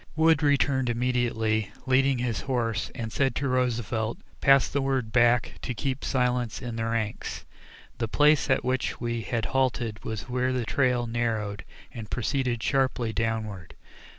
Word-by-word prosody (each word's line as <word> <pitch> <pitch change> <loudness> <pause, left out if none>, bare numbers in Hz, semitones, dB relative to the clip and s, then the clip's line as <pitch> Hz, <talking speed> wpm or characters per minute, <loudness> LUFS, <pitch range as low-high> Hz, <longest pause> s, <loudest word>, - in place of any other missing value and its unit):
Wood 160 0 +4
returned 140 -3 +2
immediately, 115 -3 0 0.2
leading 135 0 +3
his 120 -5 -2
horse, 115 -4 -1
and 115 -3 -5
said 135 -1 +1
to 140 - -1
Roosevelt: 120 -3 0 0.2
"Pass 135 -1 +5
the 140 - -1
word 135 -4 -1
back 120 0 +3
to 125 - -4
keep 135 +2 -3
silence 125 -3 0
in 120 -2 -5
the 115 0 -2
ranks." 115 -2 -3 0.5
The 115 - 0
place 150 +5 +3
at 130 - +2
which 130 +1 -1
we 120 -1 -2
had 115 -1 -2
halted 120 -4 0
was 110 0 -4
where 125 +1 0
the 125 -2 -1
trail 125 0 +1
narrowed, 110 -4 -2 0.3
and 110 -3 -8
proceeded 125 -1 -1
sharply 130 -4 +1
downward. 110 -6 -3
120 Hz, 150 wpm, -27 LUFS, 115-130 Hz, 0.5 s, Pass